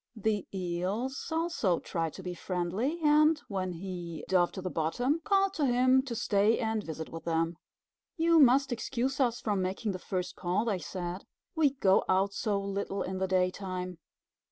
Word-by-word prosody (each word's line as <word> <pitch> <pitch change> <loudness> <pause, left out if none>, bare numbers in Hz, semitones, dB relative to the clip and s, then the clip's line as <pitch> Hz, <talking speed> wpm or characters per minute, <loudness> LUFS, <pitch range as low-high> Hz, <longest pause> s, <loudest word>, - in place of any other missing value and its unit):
The 215 -2 -1
Eels 190 +8 -3
also 320 - +1
tried 165 -2 -3
to 190 - -9
be 180 0 -4
friendly, 185 - -2
and, 305 +1 +5
when 185 -4 -2
he 175 -2 -6
dove 180 -2 +3
to 190 - -5
the 185 - -3
bottom, 245 - 0
called 390 -1 +2
to 305 -6 0
him 255 +1 +4
to 240 -3 -4
stay 210 +1 +2
and 220 -1 -1
visit 160 -1 -6
with 165 - -8
them. 165 0 0 0.6
"You 330 0 +4
must 275 0 +5
excuse 245 +3 -2
us 240 -3 +2
from 205 -3 0
making 190 +4 -2
the 185 - -5
first 180 -1 -3
call," 185 +5 0
they 205 -5 0
said. 175 +2 -5 0.3
"We 310 -5 +3
go 195 -8 +3
out 195 +1 +2
so 205 -2 0
little 200 0 -3
in 185 0 -4
the 190 - 0
daytime." 185 -1 -1
200 Hz, 175 wpm, -30 LUFS, 180-255 Hz, 0.6 s, and